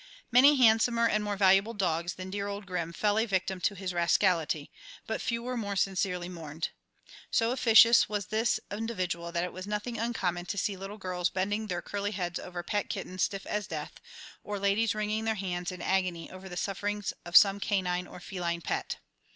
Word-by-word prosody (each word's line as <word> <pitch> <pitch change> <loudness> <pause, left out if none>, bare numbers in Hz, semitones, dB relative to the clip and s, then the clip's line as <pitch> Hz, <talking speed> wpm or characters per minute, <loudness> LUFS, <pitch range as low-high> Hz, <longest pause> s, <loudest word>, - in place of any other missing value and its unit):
Many 270 +5 +7
handsomer 230 -1 +4
and 210 -1 +1
more 205 -1 -2
valuable 195 +3 +4
dogs 175 -3 -1
than 185 0 -7
dear 200 0 -3
old 200 0 -5
Grim 175 -3 -3
fell 205 +4 +1
a 225 - +1
victim 190 -2 -1
to 200 - +1
his 185 -1 -4
rascality, 170 -3 +1 0.3
but 220 - -3
few 235 -1 -2
were 250 +1 -3
more 205 -4 -3
sincerely 185 -2 0
mourned. 160 -3 -5 0.6
So 230 0 +2
officious 235 -2 +6
was 205 -2 -2
this 220 +3 +1
individual 185 -6 -3
that 170 0 0
it 180 - -4
was 185 +2 -7
nothing 210 +2 -3
uncommon 185 -7 -1
to 200 - -3
see 200 +1 0
little 195 +2 -7
girls 180 -3 -1
bending 205 +4 -1
their 175 -3 -3
curly 205 +1 -3
heads 175 -3 -3
over 175 -1 -6
pet 205 +2 -2
kittens 185 -4 -4
stiff 195 -1 -1
as 210 -2 -2
death, - - -6 0.4
or 205 0 -4
ladies 200 +3 +1
wringing 215 +1 -1
their 220 0 +1
hands 180 -3 -3
in 180 -1 -7
agony 180 -3 -1
over 185 +1 -10
the 175 - -7
sufferings 205 +1 -2
of 175 0 -7
some 200 -1 +6
canine 180 -3 -1
or - - -11
feline 175 -2 -3
pet. - - -2
195 Hz, 190 wpm, -29 LUFS, 180-210 Hz, 0.6 s, Many